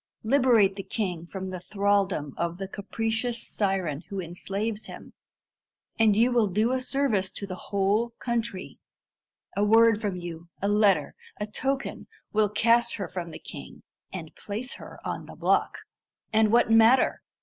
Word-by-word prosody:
Liberate 230 -5 +4
the - - -2
king 180 -7 -3
from 190 0 -5
the 185 - -5
thraldom 195 -6 0
of 170 0 -2
the 195 0 -4
capricious 225 +4 -2
siren 190 -8 0
who 200 -2 -4
enslaves 195 +5 -3
him, - - -11 0.9
and 220 -2 +5
you 235 +4 +4
will 235 -3 +3
do 215 +5 +1
a 260 0 0
service 255 -8 0
to 200 - -6
the 190 - -6 0.2
whole 200 +4 +2
country. 235 -6 -3 0.8
A 200 - +2
word 225 +1 +5
from 205 -4 -1
you 170 -1 -7
a 200 - -1
letter 205 -2 +3 0.3
a 210 - -1
token 270 +6 -3 0.3
will 210 -1 +3
cast 235 +3 +3
her 195 -4 -4
from 170 -1 -5
the 160 - -8
king, - - -10 0.3
and - - -7
place 220 +5 -5
her - - -11
on - - -4
the - - -10
block. - - +1 0.6
And 220 -1 +4
what 235 -1 +4
matter? 225 +3 +5
210 Hz, 160 wpm, -27 LUFS, 190-230 Hz, 0.9 s, and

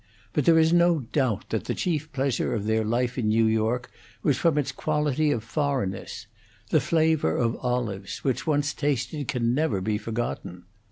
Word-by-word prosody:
But 150 - +1
there 165 -1 +6
is 160 +1 +4
no 170 -2 +4
doubt 125 -3 -1
that - - -1
the - - -2
chief 155 -3 -2
pleasure 135 -3 0
of 105 -2 -3
their 110 0 +1
life 120 +3 0
in 110 - 0
New 110 +1 +3
York 110 +3 0 0.3
was 145 - +3
from 160 +3 +2
its 140 -2 0
quality 150 0 0
of 120 -7 0
foreignness: 125 -7 -2 0.5
the - - +4
flavor 160 - +2
of 115 -1 +1
olives, 120 -6 -3
which, 130 +2 -1
once 145 -2 +1
tasted, 145 0 -2
can 120 -3 0
never 135 -8 +1
be 105 +2 -1
forgotten. 110 -6 -4
125 Hz, 175 wpm, -26 LUFS, 110-150 Hz, 0.5 s, there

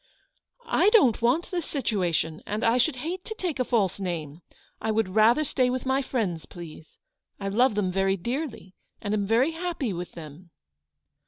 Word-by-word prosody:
" 485 - -34 0.2
I - - +7
don't 270 - +4
want 255 +9 +1
this 350 -3 -2
situation, 180 - -1
and 210 +2 -2
I 230 +2 +3
should 270 +3 +2
hate 360 +2 -3
to 440 - -5
take 360 - -3
a - - +3
false 210 -7 +1
name. 170 -4 -4 0.4
I 220 - -2
would 220 -2 +1
rather 220 +9 +4
stay 255 -3 +1
with 255 +1 -2
my 265 +1 +2
friends, 205 - -2
please. 165 -2 -11 0.4
I 195 -1 -2
love 240 +3 +3
them 195 -3 0
very 195 +1 +1
dearly, 235 - -4 0.3
and 205 -2 -3
am 205 -2 0
very 240 +8 +3
happy 325 - -3
with 175 0 -6
them." 165 +2 -11
225 Hz, 180 wpm, -26 LUFS, 185-270 Hz, 0.4 s, I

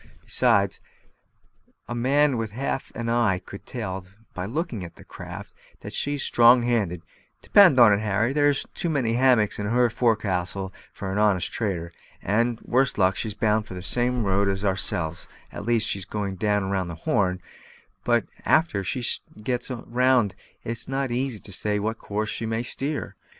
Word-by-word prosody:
Besides, - - +2 1.1
a 120 - -4
man 135 +4 +2
with 115 -2 -2
half 135 +2 -3
an 120 -1 -4
eye 115 -5 +2
could 95 +2 -11
tell 95 -6 -5 0.3
by 90 +1 -4
looking 135 - -3
at 85 - -9
that - - -16
craft - - -9 0.3
that - - -8
she's 145 -1 -1
strong 120 +1 +6
handed. 100 -8 0 0.4
Depend 185 -10 +6
on't, 105 -4 +7
Harry, 110 +4 0
there's 145 -1 +2
too 170 - -2
many 130 -7 0
hammocks 120 -5 +3
in 105 - -2
her 120 +1 +2
fo'c'stle 100 -5 0 0.2
for 95 -1 -6
an 100 - -1
honest 100 -4 +2
trader. 85 -6 -3 0.3
And, 115 +3 0
worst 130 +2 +1
luck, 95 -1 +3
she's 110 -3 -3
bound 110 0 +1
the 90 -1 -7
same 125 +3 +1
road 100 0 +1
as 95 +1 -1
ourselves 90 -4 -1 0.2
at 100 - -7
least, 115 -2 +3
she's 100 -2 -1
going 100 -1 -3
round 100 -3 0
the 85 - -6
Horn; 90 -2 +1 0.6
but 120 -1 +2 0.2
a'ter 155 -12 +2
she 125 +6 -2 0.4
gets 125 +2 -2
round 125 -3 +1 0.3
it's 115 0 -4
not 135 0 -1
so - - -3
easy 125 -1 -1
to 100 - -10
say 105 +2 -1
what 110 +2 -2
course 105 +1 -3
she 115 - -3
may 115 +1 -1
steer. 140 +4 -4
110 Hz, 165 wpm, -25 LUFS, 100-125 Hz, 1.1 s, on't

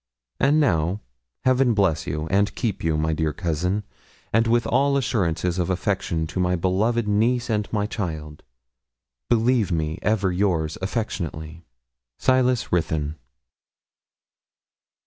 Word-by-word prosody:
'And 145 +3 +4
now, 90 - +1 0.5
Heaven 130 -2 +3
bless 95 -6 +1
and 80 +7 0
keep 110 -5 -2
you, 80 -1 +1
my 80 +1 0
dear 80 0 0
cousin; 90 +6 -1 0.5
and 115 +1 +3
with 120 +1 +2
all 140 0 +2
assurances 90 -8 0
of 90 - 0
affection 95 -3 -1
to 80 +4 -5
my 90 0 +2
beloved 105 +6 +1
niece 115 +4 +1
and 105 -1 -1
my 105 -2 0
child, 80 -8 -5 0.9
believe 115 -3 +2
me 80 -1 -1
ever 100 -3 +1
yours 90 -4 0
affectionately. 85 - -4 0.5
'SILAS 130 -2 +2
RUTHYN.' 80 -3 0
95 Hz, 120 wpm, -23 LUFS, 80-115 Hz, 0.9 s, And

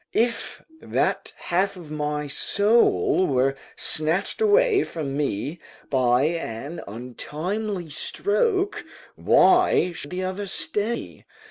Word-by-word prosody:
["If 230 +1 -1 0.2
that - - -1
half 190 +2 0
of 165 -4 -11
my 150 0 -2
soul 200 - +3
were 135 0 +2 0.2
snatch 160 - 0
away 435 0 +4
from 145 -5 -5
me 145 - -2 0.3
by 125 -1 +3
an 150 -2 -3
untimely 160 - -4
stroke, 380 - 0 0.3
why 360 - +4
should 145 -4 -7
the 185 +1 -3
other 190 +2 -3
stay? 210 +4 -3
175 Hz, 105 wpm, -24 LUFS, 145-210 Hz, 0.3 s, away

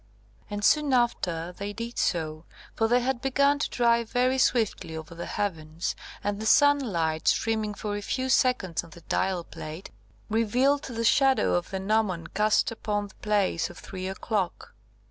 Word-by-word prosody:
And 205 0 -2
soon 300 -3 +4
after 180 -9 0
they 200 +3 -6
did 230 +2 -5
so, 155 -2 -1 0.3
for 225 - +1
they 245 +2 +3
had 250 0 -1
begun 280 +2 +2
to - - -1
drive 235 -1 +2
very 255 +1 +2
swiftly 220 -10 +1
over 160 +1 -8
the 170 +1 -6
heavens, 165 -4 -3 0.3
and 205 0 -1
the 220 - -3
sunlight, 215 - +3
streaming 220 -2 +1
for 205 0 -4
a 205 - -3
few 260 +5 -2
seconds 250 -10 +2
on 170 - -13
the 170 +2 -14
dial 185 +1 -1
plate, 160 +3 -9 0.4
revealed 245 +6 +2
the 230 -3 -4
shadow 270 +3 +4
of 175 0 0
the 190 - -3
gnomon 195 -4 0
cast 210 +2 +2
upon 205 -2 -3
the - - -19
place 205 -5 +1
of - - -12
three 185 -1 -6
o'clock. 190 -1 -3
210 Hz, 165 wpm, -27 LUFS, 180-245 Hz, 0.4 s, soon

